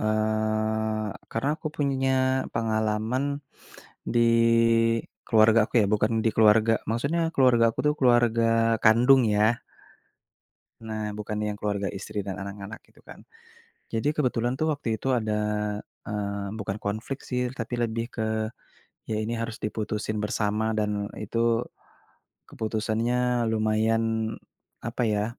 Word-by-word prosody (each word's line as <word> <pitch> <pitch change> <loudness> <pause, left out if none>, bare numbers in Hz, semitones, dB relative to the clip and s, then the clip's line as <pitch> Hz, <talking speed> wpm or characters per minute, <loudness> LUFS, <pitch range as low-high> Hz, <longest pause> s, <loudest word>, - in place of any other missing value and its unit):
eee, 110 0 0 0.2
karena 125 +5 -1
aku 155 - -4
punya 135 -2 0 0.4
pengalaman 110 +3 0 0.9
di 120 - +4 1.1
keluarga 110 0 +5
aku - - -31
ya - - +2
bukan 105 +2 +2
di 115 - +4
keluarga, 110 +1 +5 0.2
maksudnya 140 +9 0
keluarga 125 -3 +4
aku - - -29
tuh 150 - +3
keluarga 115 -2 +3
kandung 125 +4 +6
ya. 105 - +4 1.4
Nah, 110 -1 -4
bukan 105 0 -5
yang 105 -1 -3
keluarga 100 -2 -1
istri 100 +1 -5
dan 100 0 -5
anak-anak 100 +2 -7
gitu - - -24
kan. - - -12 0.7
Jadi 115 +6 +1
kebetulan 125 -2 0
tuh 155 0 +1
waktu 115 -6 -3
itu 135 +3 0
ada, 110 -3 0 0.7
eee, 100 -1 -3
bukan 100 -1 -3
konflik 110 +7 -4
sih 125 -1 -2
tapi 120 0 -4
lebih 115 0 -1
ke 110 -2 -3 0.8
ya 110 - 0
ini 110 +2 -2
harus 115 0 -4
diputusin 105 0 -3
bersama 105 +1 0
dan 105 -1 -1
itu 115 +2 0 0.8
keputusannya 115 +2 0
lumayan 110 +1 0 0.5
apa 120 +1 -3
ya, 105 0 +1
110 Hz, 125 wpm, -26 LUFS, 105-120 Hz, 1.4 s, kandung